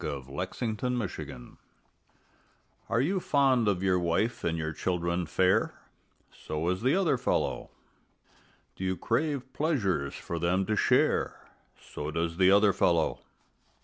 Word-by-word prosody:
THE - - -3
OTHER 70 +7 -5 0.4
FELLOW 80 - -5 1.3
Are 115 - +2
you 185 +8 +1
fond 135 -8 +2
of 95 -2 +1
your 95 -1 +3
wife 90 +7 0
and 85 0 0
your 80 -1 -3
children 85 0 -1
fair? 90 +4 +2 0.6
So 80 +2 -4
is 90 +1 -1
the 130 +6 +3
other 175 -9 +2
fellow. - - -1 1.1
Do - - -7
you 95 0 -1
crave 140 -4 -1
pleasures 95 - 0
for 85 - -5
them 90 +3 +1
to 110 - 0
share? - - +1 0.3
So 75 - -7
does 85 +1 -2
the 95 0 +5
other 100 0 +5
fellow. 85 -3 +1
95 Hz, 135 wpm, -29 LUFS, 85-120 Hz, 1.3 s, the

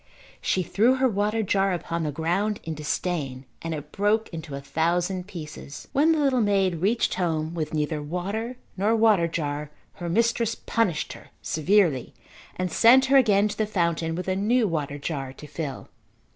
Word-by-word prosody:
She 185 - +1
threw 230 +9 +3
her 265 0 +3
water 210 0 0
jar 195 -1 +2
upon 170 -1 -3
the 155 -2 -1
ground 180 +8 -1
in 165 - -4
disdain 150 -3 -3 0.2
and 165 - -4
it 150 0 -8
broke 210 +2 +1
into 160 -4 -7
a - - -4
thousand 175 +5 -1
pieces. 155 -6 -9
When 300 +4 +4
the 320 - +2
little 270 -4 +2
maid 195 -4 +2
reached 210 +8 +1
home 160 -3 -1
with 155 -3 -3
neither 150 0 -1
water 200 +10 -3 0.2
nor 210 +4 +2
water 215 -6 +4
jar 150 -3 -3 0.3
her 175 - -3
mistress 230 +3 +1
punished 195 -9 -1
her - - -14
severely 160 - +2 0.4
and 185 -1 -2
sent 250 +7 +6
her - - +8
again 210 -5 +4
to - - -6
the 215 - +1
fountain 170 -4 0
with 180 +2 -5
a 185 - +1
new 220 +4 +2
water 145 -4 -2
jar 140 -3 -4
to 150 - -11
fill. 150 -2 -5
180 Hz, 175 wpm, -25 LUFS, 155-215 Hz, 0.4 s, her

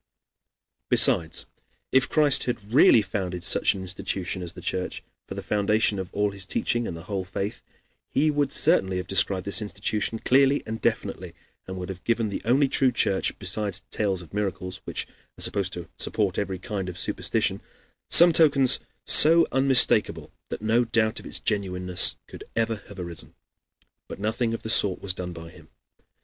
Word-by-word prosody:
Besides, 80 -2 +3 0.5
if 130 -1 +2
Christ 150 -3 +3
had 110 -3 -5
really 120 -5 +6
founded 95 -3 -5
such - - 0
an 95 - -6
institution 95 0 -5
as 90 -1 -7
the - - -11
Church 90 0 -4 0.2
for - - -7
the - - -6
foundation 105 0 0
of 95 0 -6
all 105 0 -1
his 100 -1 -6
teaching 120 +3 -1
and 85 - -6
the 80 - -10
whole 95 +1 -4
faith, 95 +4 -5 0.5
he 150 +2 +1
would 145 -2 -1
certainly 95 - +1
have 90 - -4
described 95 -1 -1
this 100 +3 0
institution 105 +2 -3
clearly 135 +4 +2
and 110 0 -6
definitely, - - -3 0.3
and 95 0 -6
would 90 0 -6
have 95 -1 -8
given 115 -2 0
the 100 - -5
only 135 +4 +3
true 130 -1 +2
Church, 95 -5 -1
besides 95 0 -5
tales 95 -4 -2
of 85 - -18
miracles, 95 -2 -4
which - - -5 0.3
are - - +2
used 95 -1 -3
to 85 -2 -7
support 100 -4 -1
every 95 -2 -3
kind 95 -1 -5
of 90 - -9
superstition, - - -2 0.5
some 175 +1 +9
tokens 140 -5 +5 0.3
so 165 +2 +7
unmistakable 135 -1 +3 0.2
that - - -6
no 115 +3 +2
doubt 115 -1 0
of - - -11
its - - 0
genuineness 90 -3 +2
could - - -11
ever 115 -1 0
have 100 - -13
arisen. 85 -2 -7 0.7
But - - -8
nothing 115 +2 -1
of - - -10
the 110 - -5
sort 100 -5 +3
was 95 -2 -2
done 90 -1 -6
by 85 -1 -10
him. - - -18
100 Hz, 175 wpm, -25 LUFS, 95-115 Hz, 0.7 s, some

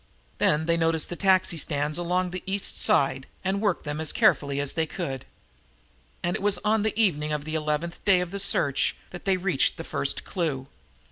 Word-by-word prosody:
Then 150 +1 +3
they 170 0 +2
noticed 165 -1 +1
the 175 - -4
taxi 185 -2 +3
stands 150 0 -1
along 180 +1 0
the 185 0 -5
East 195 +1 -1
Side 135 -1 +2 0.2
and 195 +1 0
worked 205 -5 0
them 150 +1 -3
as 160 - 0
carefully 140 -1 +2
as 145 -1 0
they 160 -1 0
could, 135 -3 -5 1.0
and 175 0 0
it - - -4
was 205 0 +2
on 215 0 +3
the 220 +1 -1
evening 155 -8 +2
of 150 -1 -2
the 155 - -5
eleventh 155 +2 -2
day 195 -3 +5
of 180 -1 -3
the 200 - -4
search 150 -8 +1 0.2
that 175 - -9
they 190 -1 +3
reached 185 0 +1
the - - -5
first - - -1
clue. 155 -8 -2
170 Hz, 200 wpm, -26 LUFS, 150-190 Hz, 1.0 s, day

